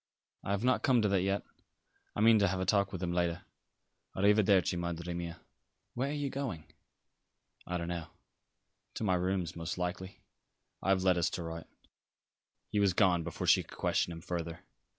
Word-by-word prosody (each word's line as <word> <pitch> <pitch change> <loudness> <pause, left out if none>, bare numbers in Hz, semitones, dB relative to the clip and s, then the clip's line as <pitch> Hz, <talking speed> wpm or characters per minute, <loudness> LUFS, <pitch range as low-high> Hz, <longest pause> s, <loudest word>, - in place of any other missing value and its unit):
"I - - -6
have 100 +2 0
not 130 +1 +3
come 125 -4 +3
to - - +4
that 100 -2 +2
yet. 100 +2 0 0.7
I - - -1
mean 115 0 +7
to 100 - +4
have 95 0 -1
a 95 - -1
talk 100 0 +2
with 95 -1 -5
him 85 -1 -1
later. 85 0 0 0.7
A - - -2
riverdervi, 100 -3 +4
Madre 85 0 -3
mia." 85 -1 -5 0.5
"Where 130 +3 -1
are - - -2
you 145 -2 -2
going?" 130 - -4 1.0
"I 90 - -1
don't 85 -1 -4
know. 85 -2 -4 0.9
To - - -3
my 100 -3 +2
rooms, 90 -1 -1
most 85 +1 -4
likely. 90 +2 -4 0.6
I - - -2
have 95 -1 +3
letters 90 -3 +3
to 90 - -4
write." 80 0 -6 1.0
He 105 - +1
was 100 -3 +3
gone 90 -2 +4
before 85 0 -4
she - - +5
could - - -13
question - - +1
him 80 0 -7
further. 85 -2 -4
90 Hz, 185 wpm, -32 LUFS, 85-100 Hz, 1.0 s, mean